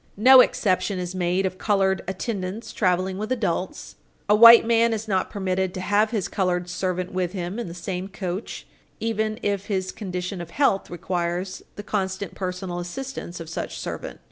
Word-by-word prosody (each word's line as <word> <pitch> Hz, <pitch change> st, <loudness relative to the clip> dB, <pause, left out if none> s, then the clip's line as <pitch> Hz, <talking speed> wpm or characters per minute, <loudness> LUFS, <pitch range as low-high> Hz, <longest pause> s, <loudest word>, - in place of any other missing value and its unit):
No 255 Hz, +5 st, +8 dB
exception 185 Hz, -4 st, +1 dB
is 180 Hz, 0 st, -4 dB
made 180 Hz, +1 st, 0 dB
of 185 Hz, 0 st, -3 dB
colored 195 Hz, -2 st, +2 dB
attendants 190 Hz, +2 st, -4 dB
traveling 185 Hz, -1 st, 0 dB
with 215 Hz, +3 st, -4 dB
adults. 195 Hz, -7 st, -2 dB, 0.3 s
A 210 Hz, -, +5 dB
white 230 Hz, +2 st, +9 dB
man 230 Hz, 0 st, +3 dB
is 220 Hz, 0 st, -4 dB
not 190 Hz, -3 st, 0 dB
permitted 190 Hz, -2 st, -1 dB
to -, -, -4 dB
have 205 Hz, +3 st, +2 dB
his 215 Hz, -5 st, -1 dB
colored 180 Hz, -2 st, -1 dB
servant 185 Hz, 0 st, -2 dB
with 185 Hz, -1 st, -2 dB
him 185 Hz, +3 st, -4 dB
in 235 Hz, -, -4 dB
the 170 Hz, -, -8 dB
same 180 Hz, +1 st, -4 dB
coach, 190 Hz, 0 st, -5 dB, 0.3 s
even 220 Hz, -1 st, -1 dB
if 200 Hz, -1 st, -1 dB
his 185 Hz, -2 st, -1 dB
condition 180 Hz, -2 st, -5 dB
of 170 Hz, -, -8 dB
health 235 Hz, -2 st, +1 dB
requires 175 Hz, +1 st, -3 dB
the 205 Hz, -, -7 dB
constant, 195 Hz, -1 st, -2 dB
personal 180 Hz, -1 st, -4 dB
assistance 180 Hz, -1 st, -6 dB
of 165 Hz, -, -7 dB
such 165 Hz, -, -5 dB
servant. -, -, -6 dB
190 Hz, 170 wpm, -24 LUFS, 180-210 Hz, 0.3 s, white